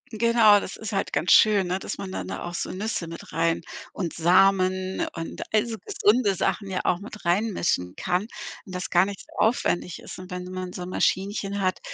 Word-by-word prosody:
Genau, 220 -2 +5
das 195 - -6
ist 220 0 -6
halt 195 - -2
ganz - - +1
schön, 205 -4 +6
ne, 180 +2 -1
dass - - -5
man 195 -1 -6
dann - - -4
da - - -5
auch 175 - -5
so - - -3
Nüsse 195 -3 -3
mit 165 0 -9
rein 165 +1 +1 0.3
und 175 -5 -3
Samen 185 +2 +3
und 165 0 -6
all 215 0 +4
so 230 -2 -5
gesunde 220 - +2
Sachen 200 +2 -1
ja 185 - -1
auch 175 - +1
mit 210 +1 -10
reinmischen 175 - 0
kann 180 +1 0 0.4
und 185 -3 -9
das 180 - -4
gar 175 +1 +4
nicht 200 -1 -6
so - - -18
aufwendig 180 -6 +1
ist - - -10
und 185 0 -10
wenn 180 -1 -5
man 185 -1 -5
so - - -6
'n 180 - -5
Maschinchen 200 +2 0
hat, 185 -1 0
190 Hz, 210 wpm, -25 LUFS, 180-210 Hz, 0.4 s, schön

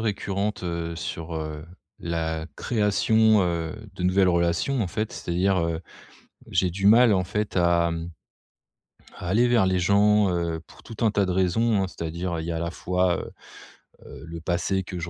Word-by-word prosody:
récurrentes, 100 -2 -2
heu, 85 -1 -3
sur, 85 -2 -5
heu, 80 -1 -5 0.3
la 80 -1 -3
création, 110 -1 +3
heu, 85 -2 -2 0.2
de - - -6
nouvelles 95 +1 +3
relations 85 +9 +1
en 95 - -1
fait. 110 +5 -3
C'est-à-dire, 95 +2 0
heu, 85 -1 -1 0.7
j'ai 90 0 +1
du 95 +3 -2
mal, 115 +1 +7
en 95 -1 +2
fait, 105 +3 -3
à 85 -1 +3 1.2
à 90 -3 -6
aller 115 +6 +3
vers 120 -5 +3
les 95 -1 +1
gens, 100 +2 +4
heu, 85 -2 -2
pour - - -17
tout 115 +1 -5
un 110 - +4
tas 100 -1 +1
de 90 - -1
raisons, 95 +4 +2
hein. 95 - -2
C'est-à-dire 85 0 -4
il 80 - -5
y 85 - -2
a, 80 - -2
à - - -2
la 85 - -2
fois, 90 0 0
heu, - - -6 0.8
heu, 70 - -11
le 85 0 -7
passé 90 +3 -1
que 90 0 -7
je 85 - -5
90 Hz, 185 wpm, -25 LUFS, 85-100 Hz, 1.2 s, mal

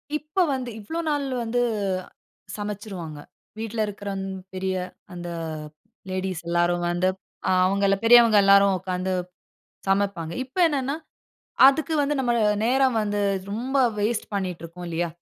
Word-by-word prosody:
இப்ப 305 +4 -3
வந்து 255 -2 -3
இவ்வளோ 320 +11 -5
நாள் 290 -1 0 0.2
வந்து 240 +2 0 1.0
சமச்சுருவாங்க. 200 -7 -6 0.4
வீட்ல 225 0 -4
இருக்கிறங் 200 -1 -5 0.3
பெரிய 190 0 -2 0.4
அந்த 175 0 -6 0.8
லேடீஸ் 185 -2 -3
எல்லாரும் 175 0 +1
வந்து 175 +2 +1 0.5
அவங்கள 195 +2 +3
பெரியவங்க 230 -2 +7
எல்லாரும் 200 0 +6
உட்கார்ந்து 185 0 -2 0.8
சமப்பாங்க. 195 -4 0
இப்ப 265 +6 -24
என்னனென்னா 280 -1 -1 0.7
அதுக்கு 285 +3 +3
வந்து, 290 +1 +1
நம்ம 245 -2 +1 0.3
நேரம் 260 0 +3
வந்து 205 0 -1 0.3
ரொம்ப 250 +6 -2 0.2
வேஸ்ட் 215 +2 0
பண்ணீட்டு 185 -4 -3
இருக்கோம் 175 +2 -8
இல்லையா? 170 +1 -1
200 Hz, 120 wpm, -25 LUFS, 185-245 Hz, 1.0 s, பெரியவங்க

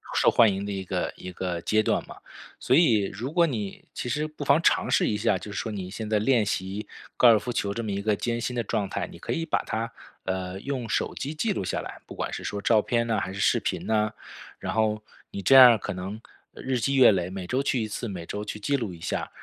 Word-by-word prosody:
受 - - +4
欢 115 -3 +5
迎 100 +1 -4
的 100 - -4
一 95 -1 -4
个 - - -2
一 90 - -8
个 90 -1 -3
阶 110 +4 +2
段 - - +1
嘛。 - - -10 0.4
所 - - 0
以 120 -12 +5
如 120 +9 -5
果 170 -1 +5
你 110 -10 -4
其 - - -5
实 150 +5 -1
不 150 -1 -8
妨 140 +4 +4
尝 - - +3
试 - - +3
一 105 - 0
下， 105 - +2
就 105 - -9
是 100 - -6
说 - - -2
你 95 -3 -5
现 110 +2 -6
在 110 -1 +2
练 115 0 +3
习 100 +2 -3 0.3
高 125 - +6
尔 115 -2 +8
夫 115 +4 -4
球 100 -3 -1
这 115 - -4
么 105 - -3
一 100 0 -2
个 105 0 +1
艰 120 +2 -2
辛 125 +1 -3
的 120 - 0
状 100 -1 -1
态， - - -2
你 - - -12
可 - - -3
以 165 - -2
把 160 - 0
它， 115 +1 -3 0.3
呃， 95 0 -3
用 130 -3 -3
手 - - 0
机 145 +3 -4
记 215 +8 0
录 140 - -2
下 - - -2
来， - - -9
不 - - -10
管 - - -3
是 - - -6
说 100 - -3
照 110 +1 +4
片 115 0 0
啊 110 - +2
还 95 +1 -4
是 100 - -4
视 - - +3
频 - - -3
呢。 110 -1 +1 0.4
然 - - -4
后 110 -1 +1 0.3
你 100 - -5
这 135 - +3
样 125 -3 +10
可 - - -5
能 95 +4 -6 0.3
日 130 -1 -2
积 135 +4 0
月 130 -4 +8
累， 90 -3 -1
每 95 -1 -6
周 130 +8 0
去 130 -4 0
1 110 - -5
次， 120 - -4
每 90 -5 -6
周 105 +4 -5
去 105 - -5
记 140 +7 0
录 110 -8 -4
一 85 - -12
下， - - -3
110 Hz, 285 characters per minute, -26 LUFS, 100-125 Hz, 0.4 s, 样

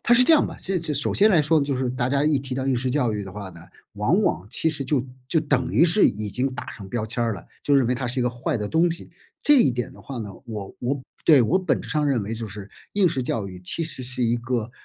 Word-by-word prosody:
它 240 - +2
是 240 +1 +9
这 320 +6 +6
样 300 - +3
的， - - -8
这 170 -5 0
首 145 - 0
先 210 +2 +5
来 175 -6 +5
说 155 +2 +3
呢， 140 - +1
就 140 - -1
是 130 0 -1
大 125 -1 -1
家 140 +1 +1
一 150 -2 +3
提 130 -1 -5
到 130 0 -3
应 135 -2 +1
试 125 +1 -1
教 125 -4 +1
育 105 -1 -3
的 95 - -9
话 100 0 -7
呢， 85 -2 -13 0.3
往 - - +2
往 90 +5 0
其 160 - +1
实 150 -3 -1
就 130 -1 0 0.2
就 165 - +2
等 145 -4 0
于 - - +5
是 175 +5 +5
已 105 +1 -2
经 130 +6 -1
打 145 - -7
上 100 - -10
标 110 +2 -2
签 120 +1 -1
儿 115 - 0
了， 95 -5 -9 0.2
就 145 - +2
认 135 -3 +4
为 125 - +1
它 125 0 -3
是 125 +2 -2
一 - - +1
个 125 - +2
坏 125 +4 -3
的 105 -1 -3
东 165 +6 +2
西， 170 - -4 0.3
这 295 - +6
一 245 - +5
点 125 0 -3
儿 - - -15
的 - - -15
话 135 -3 -7
呢， 105 -3 -5 0.2
我 105 -4 -7
我 130 +2 -2 0.2
对， 150 -5 +7
我 135 +11 +3
本 185 - 0
质 - - -9
上 150 -2 0
认 130 -6 +1
为 105 +3 -4
就 115 0 -5
是 100 -1 -9 0.2
应 195 -3 +3
试 135 -5 -2
教 110 -4 -2
育 90 -1 -10
其 90 - -1
实 155 -5 -2
是 125 0 -3
一 120 0 +2
个 120 -1 -3
130 Hz, 325 characters per minute, -23 LUFS, 115-150 Hz, 0.3 s, 是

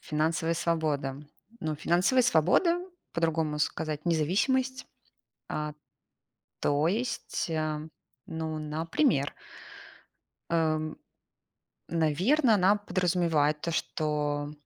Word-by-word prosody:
Финансовая 160 +2 0
свобода. 155 -5 0 0.4
Ну, 155 -3 -2
финансовая 185 - +3
свобода, 255 - +3 0.3
по-другому 160 -2 0
сказать, 150 0 -2
независимость. 250 - +1 0.6
А. 150 0 -3 0.9
То 145 +2 +2
есть, 230 -2 -2
а, 155 -1 -1 0.5
ну, 160 -1 -4
например. 155 - 0 1.2
эм, 155 -2 0 0.9
наверно, 185 - +3
она 200 +1 +4
подразумевает 170 -6 +1
то, 170 - -2
что, 150 -2 -1
160 Hz, 80 wpm, -29 LUFS, 150-185 Hz, 1.2 s, она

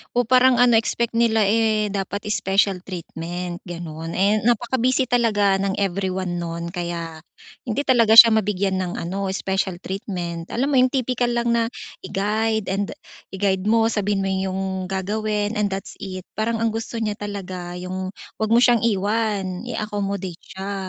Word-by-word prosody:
Oh, 245 - +4
parang 255 +1 +5
ano, 240 -2 +6
expect 235 +1 0
nila 225 -1 +3
eh, 215 -1 +2
dapat 200 0 -3
special 195 -2 +1
treatment, 175 0 -6
gano'n. 165 -2 -6
Eh, 200 +3 +3
napaka-busy 245 +2 +1
talaga 210 -5 +3
ng 195 0 -1
everyone 185 -2 -1
no'n 170 0 -4
kaya 170 -2 -5 0.4
hindi 235 +2 -1
talaga 230 -4 +5
siya 230 0 +12
mabigyan 195 -2 0
ng 180 -1 -2
ano, 195 +4 -3
special 190 -2 -2
treatment. 180 -4 -5
Alam 270 +5 0
mo - - +3
'yon, 255 0 +5
tipikal 250 -2 0
lang 235 0 0
na 235 - +2 0.4
i-guide 215 +3 0
and 200 +1 0 0.5
i-guide 190 -1 0
mo. 225 +1 +3
Sabihin 205 -2 0
mo 195 - -1
yung 190 0 -1 0.3
gagawin 210 +2 -1
and 210 -1 +1
that's 195 - -6
it. 185 -2 -7
Parang 225 +1 0
ang 230 - +2
gusto 225 +1 -4
niya 210 -2 -1
talaga 185 -4 -6
yung 185 +1 -4 0.3
huwag 220 -1 0
mo - - +6
siyang 240 -3 +5
iwan, 205 -2 0
i-accommodate 200 -5 -3
siya. 195 +1 -6
200 Hz, 155 wpm, -22 LUFS, 185-225 Hz, 0.5 s, siya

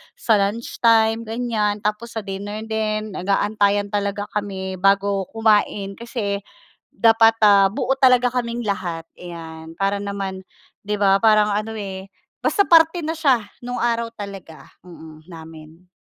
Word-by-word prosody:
sa 220 -3 +2
lunch 205 +4 -3
time 225 -1 +3
ganyan, 220 -3 -2
tapos 215 +3 -3
sa 220 - -3
dinner 205 +2 -6
din 215 -1 -2
nag-aantayan 200 +1 0
talaga 205 0 -2
kami 190 -2 -4
bago 195 0 +2
kumain 210 -2 +1
kasi 220 -4 -3 0.6
dapat 225 0 +5
ah 200 -2 +6
buo 255 +6 -2
talaga 250 -2 +4
kaming 240 -1 -3
lahat 180 -5 -3 0.2
iyan. 165 -2 -9
Para 195 +1 -1
naman 200 -1 -5 0.5
'di 210 0 -1
ba 195 -1 +3
parang 215 -2 +4
ano 215 +2 -2
eh 195 -2 -7 0.3
basta 405 - +2
parte 330 0 +4
na 320 - -1
siya 275 -8 +2 0.2
nung 245 0 -5
araw 235 -1 0
talaga 195 -6 -10 0.6
namin. 160 0 -13
205 Hz, 135 wpm, -21 LUFS, 195-225 Hz, 0.6 s, ah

